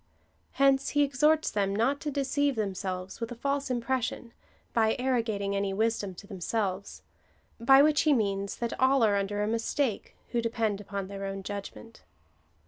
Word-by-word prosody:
Hence 275 0 +3
he 290 - +6
exhorts 300 +3 +2
them 200 -1 0
not 260 +7 +1
to 300 - -2
deceive 280 0 0
themselves 190 -2 -4
with 230 +1 -3
a - - -5
false 280 +3 -2
impres 250 +1 0
sion, 235 0 -5 0.4
by 220 -1 +3
arrogating 225 -6 0
any 200 -1 -1
wisdom 215 -3 0
to 185 - -11
themselves 200 0 -3 0.3
— - - -38
by 270 +4 +7
which 305 0 +4
he 310 - +3
means, 200 -5 0
that 235 -1 -2
all 260 -1 +4
are 210 -2 +4
under 205 +1 -1
a - - 0
mistake, 230 +1 -1 0.2
who 240 0 +1
depend 225 -3 -1
upon 200 -1 -4
their 195 0 -6
own 195 0 -5
judgment. 205 +3 -8
225 Hz, 170 wpm, -29 LUFS, 200-265 Hz, 0.4 s, by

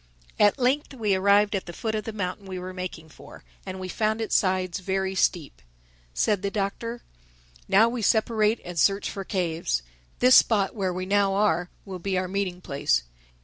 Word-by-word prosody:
At 205 +3 +5
length 270 +2 0
we 215 -5 0
arrived 200 +2 +3
at 190 - -3
the 175 - -7
foot 220 +5 -3
of 215 -1 -3
the 225 - -4
mountain 200 -1 -4
we 185 -1 -5
were 185 +1 -6
making 180 -3 -7
for; - - -14 0.2
and 185 0 -5
we 185 - -5
found 215 +4 -1
its 225 - -1
sides 185 -2 +1
very 190 0 -1
steep. 175 -5 0 0.5
Said 185 - +1
the 200 - -1
Doctor, 215 +4 -3 0.6
"Now 215 +4 +5
we 240 +1 -3
will - - -4
separate 220 0 +2
and 175 -2 -4
search 195 +3 +2
for 195 - -5
caves. 170 - -1 0.3
This 255 +1 +5
spot 205 -4 +4
where 195 -4 -1
we 185 +1 -4
now 200 0 +2
are, 180 -4 +1 0.2
will 190 -2 -7
be 190 +1 -2
our 185 0 -1
meeting 185 -1 -3
place. 140 - 0
195 Hz, 190 wpm, -25 LUFS, 185-215 Hz, 0.6 s, At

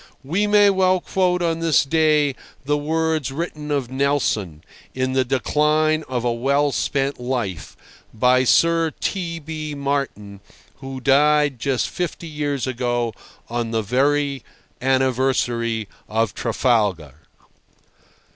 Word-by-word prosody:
We 180 +10 0
may 205 -1 +5
well 185 -1 +2
quote 180 -1 0
on 165 -1 0
this 165 -3 +3
day 150 -1 +2 0.3
the 145 +1 +1
words 155 -1 -1
written 150 0 -5
of 140 -4 -1
Nelson, 130 - -1 0.3
in 130 0 -1
the 130 0 +2
decline 150 +4 +1
of 125 -2 -2
a 120 - +1
well 140 +4 +1
spent 135 0 -1
life, 120 - -4 0.3
by 125 +3 +3
Sir 165 +4 +3
T. 170 -4 -2
B. 155 -1 -6
Martin, 135 -8 -3 0.4
who 135 -1 -7
died 145 0 +3
just 135 0 0
fifty 175 -1 -4
years 145 -3 -2
ago 120 -2 -1 0.3
on 120 -1 -3
the 115 -1 -1
very 140 +3 +1 0.4
anniversary 125 -4 0 0.2
of 110 -1 0
Trafalgar. 100 - -1
135 Hz, 120 wpm, -21 LUFS, 120-155 Hz, 0.4 s, may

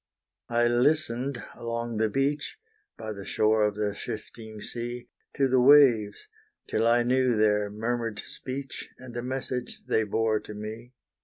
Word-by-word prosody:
I 120 0 +3
listened 125 0 +1
along 115 -1 -4
the 110 0 +2
beach, 140 - -1 0.4
By 110 -1 -5
the 100 -1 -8
shore 110 +2 +2
of 105 -1 +2
the 105 -1 -1
shifting 110 0 -7
sea, 120 +2 -6 0.3
To 135 - +3
the 130 -1 +3
waves, 125 -6 +5 0.4
till 115 - +1
I 120 +1 +4
knew 125 -1 +2
their 105 -1 +3
murmured 115 +1 -2
speech, 135 +1 -6
And 130 -2 -11
the 120 - -3
message 125 0 -4
they 110 - +2
bore 110 +1 +1
to 105 - -10
me. 110 +4 -7
120 Hz, 150 wpm, -27 LUFS, 110-125 Hz, 0.4 s, waves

